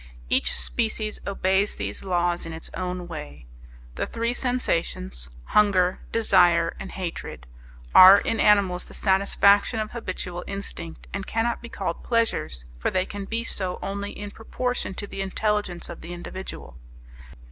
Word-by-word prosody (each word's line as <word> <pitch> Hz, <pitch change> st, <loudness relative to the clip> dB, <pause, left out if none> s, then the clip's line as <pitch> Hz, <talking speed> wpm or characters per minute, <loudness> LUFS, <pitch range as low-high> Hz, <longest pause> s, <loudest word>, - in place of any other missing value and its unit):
Each -, -, +2 dB
species 220 Hz, -2 st, 0 dB
obeys 195 Hz, +1 st, +1 dB
these -, -, -4 dB
laws 175 Hz, -2 st, 0 dB
in 165 Hz, -, -6 dB
its 160 Hz, -, -8 dB
own 180 Hz, -1 st, -4 dB
way. 75 Hz, -, -8 dB, 0.5 s
The -, -, -2 dB
three 230 Hz, +1 st, -1 dB
sensations: 170 Hz, -, -1 dB
hunger, 185 Hz, -, +3 dB
desire, 175 Hz, -6 st, +4 dB
and 195 Hz, -, -7 dB
hatred 170 Hz, -, -6 dB, 0.5 s
are 185 Hz, +2 st, +11 dB
in 225 Hz, -, -1 dB
animals 195 Hz, -4 st, +4 dB
the -, -, -11 dB
satisfaction 200 Hz, +2 st, +3 dB
of 215 Hz, 0 st, -3 dB
habitual 185 Hz, -6 st, -5 dB
instinct, 195 Hz, -4 st, -6 dB
and 195 Hz, -1 st, -4 dB
cannot 230 Hz, +1 st, 0 dB
be 235 Hz, -, -9 dB
called 185 Hz, -6 st, -4 dB
pleasures, 225 Hz, -, 0 dB
for -, -, 0 dB
they 185 Hz, 0 st, 0 dB
can 205 Hz, -1 st, -6 dB
be 230 Hz, +3 st, -2 dB
so 185 Hz, -5 st, -2 dB
only 200 Hz, +1 st, -3 dB
in 205 Hz, 0 st, -6 dB
proportion 245 Hz, -2 st, -3 dB
to 205 Hz, -, -4 dB
the 195 Hz, -, -6 dB
intelligence 195 Hz, -2 st, -1 dB
of -, -, -9 dB
the 170 Hz, +2 st, -7 dB
individual. 175 Hz, -, -8 dB
195 Hz, 145 wpm, -25 LUFS, 175-210 Hz, 0.5 s, are